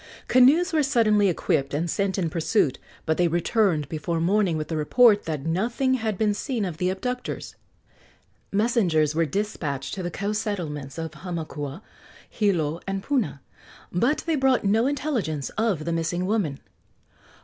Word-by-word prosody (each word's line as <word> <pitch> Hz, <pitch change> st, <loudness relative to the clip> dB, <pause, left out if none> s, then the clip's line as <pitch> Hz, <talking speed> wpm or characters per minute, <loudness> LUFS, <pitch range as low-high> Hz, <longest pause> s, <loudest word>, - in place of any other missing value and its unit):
Canoes 300 Hz, +9 st, +5 dB
were 310 Hz, -, +3 dB
suddenly 220 Hz, -7 st, +3 dB
equipped 140 Hz, -5 st, 0 dB
and 165 Hz, +4 st, -1 dB
sent 195 Hz, +3 st, -1 dB
in 170 Hz, -4 st, -1 dB
pursuit, 160 Hz, -, +1 dB, 0.3 s
but 160 Hz, -1 st, +1 dB
they 175 Hz, -, +3 dB
returned 175 Hz, -, +1 dB
before 165 Hz, +2 st, -2 dB
morning 180 Hz, 0 st, +2 dB
with 155 Hz, -, -3 dB
the 165 Hz, -, -2 dB
report 205 Hz, +8 st, +4 dB
that 155 Hz, -3 st, -4 dB
nothing 235 Hz, +10 st, 0 dB
had 220 Hz, -5 st, -1 dB
been 210 Hz, 0 st, +2 dB
seen 230 Hz, 0 st, -2 dB
of 175 Hz, -4 st, -5 dB
the 180 Hz, +2 st, 0 dB
abductors. 250 Hz, +7 st, -4 dB, 1.0 s
Messengers 195 Hz, -, +2 dB
were 165 Hz, 0 st, +1 dB
despatched 145 Hz, -7 st, -3 dB
to 195 Hz, -, -4 dB
the 175 Hz, -, -3 dB
coast 205 Hz, +4 st, -2 dB
settlements 150 Hz, -10 st, -4 dB
of 160 Hz, -1 st, -4 dB
Hamakua, 160 Hz, -1 st, -6 dB, 0.4 s
Hilo 170 Hz, -7 st, 0 dB
and 195 Hz, 0 st, -3 dB
Puna, 225 Hz, -, -1 dB, 0.5 s
but 240 Hz, -, +1 dB
they 330 Hz, -2 st, +1 dB
brought 265 Hz, -2 st, +2 dB
no 220 Hz, +5 st, +3 dB
intelligence 255 Hz, -, -2 dB
of 210 Hz, -9 st, -1 dB
the 170 Hz, -, -1 dB
missing 170 Hz, +2 st, -1 dB
woman. 185 Hz, -9 st, -1 dB
190 Hz, 155 wpm, -25 LUFS, 160-225 Hz, 1.0 s, Canoes